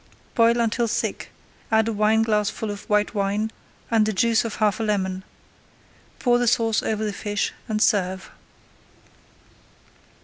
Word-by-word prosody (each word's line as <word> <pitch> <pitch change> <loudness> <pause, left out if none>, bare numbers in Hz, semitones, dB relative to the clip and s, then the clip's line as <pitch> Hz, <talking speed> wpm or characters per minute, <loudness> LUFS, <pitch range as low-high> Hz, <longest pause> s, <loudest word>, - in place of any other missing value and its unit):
Boil 230 0 +4
until 235 +1 +1
thick, - - -2 0.4
add 220 0 +3
a 230 - -1
wineglassful 215 0 +1
of 205 0 -9
white 210 +1 +2
wine 205 +1 -1 0.4
and 225 -2 +4
the - - +1
juice 225 +3 +2
of 230 -2 -4
half 210 -2 +1
a - - -1
lemon. 190 -3 -1 0.9
Pour 245 -1 +2
the 245 - +1
sauce 225 -1 +2
over 220 0 -2
the 210 - -2
fish 205 0 -2
and 215 -2 -1
serve. 190 -2 0
215 Hz, 140 wpm, -23 LUFS, 205-225 Hz, 0.9 s, Boil